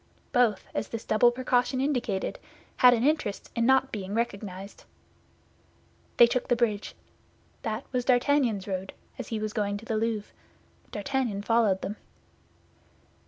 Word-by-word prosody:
Both, 240 Hz, -6 st, +2 dB
as -, -, -2 dB
this 230 Hz, -1 st, -6 dB
double 215 Hz, +3 st, +5 dB
precaution 255 Hz, +1 st, 0 dB
indicated, 245 Hz, -8 st, -1 dB, 0.4 s
had 250 Hz, -1 st, +7 dB
an 230 Hz, -, -1 dB
interest 290 Hz, -8 st, 0 dB
in 235 Hz, 0 st, +2 dB
not 265 Hz, 0 st, +4 dB
being 200 Hz, -1 st, -4 dB
recognized. 200 Hz, -4 st, -4 dB, 1.3 s
They 240 Hz, -, +9 dB
took 245 Hz, +1 st, -1 dB
the 245 Hz, -, +3 dB
bridge. 215 Hz, -4 st, -1 dB, 0.7 s
That 225 Hz, +1 st, -3 dB
was 250 Hz, -1 st, -1 dB
D'Artagnan's 245 Hz, -5 st, +2 dB
road, 190 Hz, -1 st, -4 dB, 0.3 s
as 255 Hz, -, -5 dB
he 225 Hz, -, -3 dB
was 215 Hz, 0 st, -3 dB
going 205 Hz, -2 st, -1 dB
to 220 Hz, -, -11 dB
the 220 Hz, -1 st, -1 dB
Louvre. 220 Hz, -2 st, -2 dB, 0.6 s
D'Artagnan 220 Hz, -2 st, -2 dB
followed 220 Hz, -4 st, +2 dB
them. 210 Hz, -, -4 dB
230 Hz, 140 wpm, -27 LUFS, 205-250 Hz, 1.3 s, They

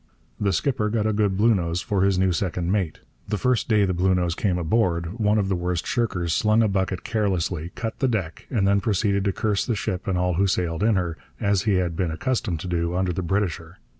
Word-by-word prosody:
The 100 Hz, -1 st, +1 dB
skipper 105 Hz, -, 0 dB
got 110 Hz, -1 st, 0 dB
a 110 Hz, -, +1 dB
good 100 Hz, -2 st, +1 dB
Bluenose 90 Hz, -6 st, +2 dB
for 100 Hz, -2 st, 0 dB
his 95 Hz, -1 st, +3 dB
new 95 Hz, 0 st, +2 dB
second 90 Hz, 0 st, -1 dB
mate. 95 Hz, -6 st, -1 dB, 0.3 s
The 105 Hz, -, -1 dB
first 125 Hz, +1 st, +1 dB
day 105 Hz, -2 st, +4 dB
the 95 Hz, -, 0 dB
Bluenose 90 Hz, -1 st, +1 dB
came 95 Hz, -3 st, 0 dB
aboard 85 Hz, +1 st, 0 dB
one 105 Hz, 0 st, +3 dB
of 100 Hz, -2 st, +1 dB
the 95 Hz, -, 0 dB
worst 90 Hz, -1 st, -2 dB
shirkers 90 Hz, -8 st, -1 dB
slung 110 Hz, +4 st, +3 dB
a -, -, +3 dB
bucket 95 Hz, -2 st, -1 dB
carelessly, 90 Hz, -6 st, -1 dB
cut 115 Hz, -1 st, -4 dB
the 135 Hz, -, +2 dB
deck, 100 Hz, -9 st, -3 dB
and 105 Hz, -7 st, +1 dB
then 100 Hz, 0 st, +3 dB
proceeded 100 Hz, -2 st, +1 dB
to 100 Hz, -, +2 dB
curse 105 Hz, 0 st, 0 dB
the 120 Hz, -, -1 dB
ship 95 Hz, -3 st, -3 dB
and 95 Hz, -2 st, 0 dB
all 90 Hz, 0 st, +1 dB
who 95 Hz, +4 st, +2 dB
sailed 90 Hz, -2 st, -1 dB
in 110 Hz, 0 st, +3 dB
her, 85 Hz, -3 st, -1 dB, 0.2 s
as 100 Hz, -2 st, +2 dB
he -, -, +3 dB
had 90 Hz, -2 st, 0 dB
been 90 Hz, 0 st, 0 dB
accustomed 95 Hz, -1 st, -2 dB
to 95 Hz, -, -5 dB
do 85 Hz, 0 st, -1 dB
under 90 Hz, -1 st, 0 dB
the 95 Hz, -, -2 dB
Britisher. 85 Hz, -2 st, -2 dB
95 Hz, 225 wpm, -24 LUFS, 90-105 Hz, 0.3 s, day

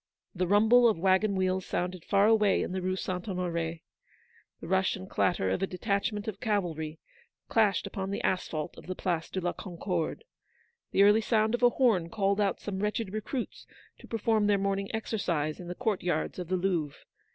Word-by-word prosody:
The 180 Hz, -1 st, -1 dB
rumble 220 Hz, +5 st, +6 dB
of 215 Hz, -, 0 dB
waggon 190 Hz, +3 st, +2 dB
wheels 185 Hz, 0 st, 0 dB
sounded 180 Hz, -1 st, -3 dB
far 200 Hz, 0 st, +3 dB
away 215 Hz, -2 st, +4 dB
in -, -, -4 dB
the 185 Hz, 0 st, -2 dB
Rue 185 Hz, +1 st, -1 dB
St. 185 Hz, +1 st, -4 dB
Honore. 170 Hz, -3 st, -2 dB, 0.8 s
The -, -, -8 dB
rush 190 Hz, +1 st, +2 dB
and 190 Hz, -1 st, -8 dB
clatter 175 Hz, -, +1 dB
of 95 Hz, -, -1 dB
a 195 Hz, -, +1 dB
detachment 200 Hz, +3 st, -2 dB
of 205 Hz, -2 st, -4 dB
cavalry 165 Hz, -8 st, -2 dB, 0.5 s
clashed 210 Hz, -5 st, +2 dB
upon 190 Hz, -1 st, -4 dB
the 200 Hz, -, -3 dB
asphalte 160 Hz, -4 st, -1 dB
of -, -, -14 dB
the 185 Hz, -, -3 dB
Place 170 Hz, -3 st, -2 dB
de 190 Hz, -, -3 dB
la 175 Hz, -1 st, -1 dB
Concorde. 175 Hz, -, -3 dB, 0.7 s
The 200 Hz, -, +4 dB
early 210 Hz, +2 st, +6 dB
sound 220 Hz, 0 st, +2 dB
of 240 Hz, -, 0 dB
a 245 Hz, -, +7 dB
horn 220 Hz, -10 st, +2 dB
called 200 Hz, 0 st, +1 dB
out 200 Hz, -2 st, +1 dB
some 195 Hz, -2 st, -4 dB
wretched 210 Hz, 0 st, -2 dB
recruits 220 Hz, +4 st, -4 dB, 0.3 s
to -, -, -13 dB
perform 220 Hz, -2 st, +1 dB
their 205 Hz, -1 st, +4 dB
morning 195 Hz, 0 st, -1 dB
exercise 175 Hz, -9 st, -2 dB
in 180 Hz, -, -8 dB
the 180 Hz, -, -5 dB
court 220 Hz, -4 st, -1 dB
yards 180 Hz, +1 st, -1 dB
of 180 Hz, -, -4 dB
the 185 Hz, +1 st, 0 dB
Louvre. 175 Hz, -6 st, -1 dB
190 Hz, 190 wpm, -29 LUFS, 180-210 Hz, 0.8 s, a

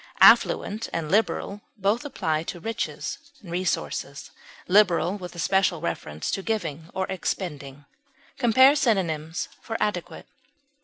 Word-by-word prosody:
Affluent 215 Hz, +3 st, +5 dB
and 160 Hz, -2 st, -3 dB
liberal 205 Hz, -1 st, 0 dB, 0.2 s
both 205 Hz, +5 st, +1 dB
apply 160 Hz, -, -1 dB
to 175 Hz, -, -5 dB
riches, 225 Hz, +6 st, -4 dB, 0.2 s
resources; 180 Hz, 0 st, -3 dB, 0.4 s
liberal, 185 Hz, -1 st, +4 dB
with 180 Hz, -3 st, -8 dB
especial 185 Hz, 0 st, +1 dB
reference 75 Hz, -, -4 dB
to 195 Hz, -, -2 dB
giving 165 Hz, -7 st, -3 dB
or 190 Hz, 0 st, 0 dB
expending. 145 Hz, -7 st, -4 dB, 0.5 s
(Compare 260 Hz, +3 st, +6 dB
synonyms 170 Hz, -, 0 dB
for 225 Hz, -, -4 dB
ADEQUATE.) 205 Hz, -5 st, -3 dB
185 Hz, 110 wpm, -25 LUFS, 165-210 Hz, 0.5 s, Compare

